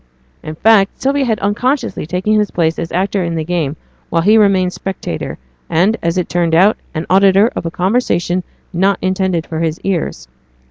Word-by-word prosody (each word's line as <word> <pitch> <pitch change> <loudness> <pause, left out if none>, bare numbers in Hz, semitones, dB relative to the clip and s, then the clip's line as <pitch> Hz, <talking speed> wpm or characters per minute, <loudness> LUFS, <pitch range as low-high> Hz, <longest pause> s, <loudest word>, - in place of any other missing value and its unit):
In 155 - -7
fact, 200 +1 +3
Sylvia 275 +1 +1
had 220 -3 0
unconsciously 245 - -1
taken 185 +5 -1
his 210 -2 +2
place 165 -1 0
as 165 - -4
actor 190 +2 0
in 170 -1 -2
the 160 - -2
game 160 -4 -2 0.3
while 165 0 +1
he 210 +4 +5
remained 195 -4 +3
spectator, 195 0 -5 0.3
and, 190 +7 +2
as 170 +2 -1
it 180 - 0
turned 170 -1 0
out, 195 +6 +4 0.2
an 155 +1 -2
auditor 195 +4 +4
of 165 - -3
a - - -1
conversation 180 -2 0 0.3
not 190 +2 +2
intended 185 -3 0
for 160 - -5
his 165 -1 -1
ears. 180 - -3
185 Hz, 180 wpm, -16 LUFS, 170-205 Hz, 0.3 s, he